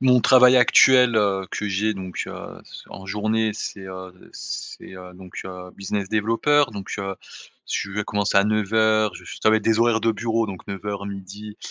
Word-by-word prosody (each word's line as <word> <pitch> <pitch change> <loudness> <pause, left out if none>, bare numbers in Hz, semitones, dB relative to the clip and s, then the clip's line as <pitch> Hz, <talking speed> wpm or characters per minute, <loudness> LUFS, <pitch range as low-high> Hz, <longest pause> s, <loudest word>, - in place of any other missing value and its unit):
mon 125 -2 +4
travail 125 0 +6
actuel, 125 -1 +6
heu, 100 -3 +1
que 105 - -3
j'ai 105 +3 0
donc, 95 -2 -5
heu, - - -9
c - - -12
en 95 - -11
journée, 110 +2 0
c'est, 100 -2 -6
heu, 95 -1 -9 0.2
c'est, - - -8
heu, 90 0 -11
donc, 90 -1 -9
heu, 90 -1 -9
business 100 0 -3
developer, 115 +8 +2
donc, 100 -2 -8
heu, 95 0 -4 0.6
je 100 - -2
vais 105 - -2
commencer 105 -1 -1
à 100 - +3
9:00, 110 0 +1
je - - -11
f - - -9
ça 110 - +5
va 110 - +5
être - - -2
des 110 0 +2
horaires 115 -1 +3
de 115 - +2
bureau, 115 +1 -1
donc 95 -3 -9
9:00-12:00 100 +1 -7
105 Hz, 190 wpm, -22 LUFS, 95-110 Hz, 0.6 s, travail